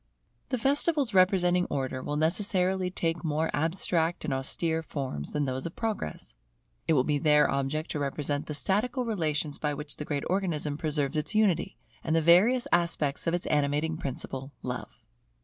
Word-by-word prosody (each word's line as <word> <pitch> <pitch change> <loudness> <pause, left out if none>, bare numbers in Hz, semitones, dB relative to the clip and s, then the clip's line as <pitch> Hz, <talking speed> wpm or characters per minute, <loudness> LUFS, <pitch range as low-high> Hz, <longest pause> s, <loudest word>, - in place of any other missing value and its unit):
The 255 - 0
festivals 280 0 +2
representing 180 -1 +4
Order 130 -2 -3
will 145 - -3
necessarily 185 +2 +1
take 170 -2 -2
more 160 0 0
abstract 165 +1 +1
and 140 - -1
austere 160 +5 0
forms 135 - -5
than 150 -1 0
those 130 +2 -2
of 170 - -10
Progress. 215 - -4 0.5
It 160 - +4
will 130 -4 +4
be 145 +1 0
their 150 -1 +5
object 140 +3 -2
to 150 - -2
represent 145 0 -2
the 150 - -3
statical 240 - 0
relations 155 -8 -1
by 150 -1 -1
which 150 0 -6
the 150 - -5
great 145 -2 -2
Organism 170 -6 -1
preserves 150 -2 -1
its 150 +8 -2
unity, 200 -6 +2 0.3
and 160 - 0
the 165 - +3
various 205 +10 +5
aspects 165 -4 +1
of 165 - +2
its 175 - -3
animating 150 +2 +1
principle, 135 -2 -5
Love. - - -6
160 Hz, 165 wpm, -28 LUFS, 145-180 Hz, 0.5 s, their